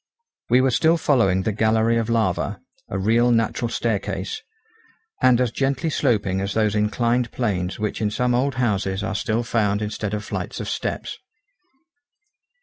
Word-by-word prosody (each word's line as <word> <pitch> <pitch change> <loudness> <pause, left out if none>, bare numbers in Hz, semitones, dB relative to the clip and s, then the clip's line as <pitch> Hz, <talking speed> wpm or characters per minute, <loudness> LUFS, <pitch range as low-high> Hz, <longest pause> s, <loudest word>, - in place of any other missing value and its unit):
We 125 +2 +5
were 130 0 +2
still 160 +7 +3
following 95 - +2
the 110 - 0
gallery 110 +2 +2
of 115 0 -1
lava, 100 -4 0 0.3
a - - -3
real 115 +5 +3
natural 115 0 +1
staircase, 115 - -2 0.8
and 125 -2 +5
as 125 -3 +1
gently 135 +5 -1
sloping 100 -10 +1
as 100 0 -3
those 110 -2 +2
inclined 115 +3 +1
planes 95 -7 -2
which 105 0 -3
in 105 - +1
some 125 +3 0
old 130 +2 +1
houses 100 -5 0
are 110 0 -2
still 110 +3 -1
found 105 -3 0
instead 105 0 -3
of 105 -1 -5
flights - - -4
of - - -5
steps. - - -4
110 Hz, 155 wpm, -22 LUFS, 105-120 Hz, 0.8 s, We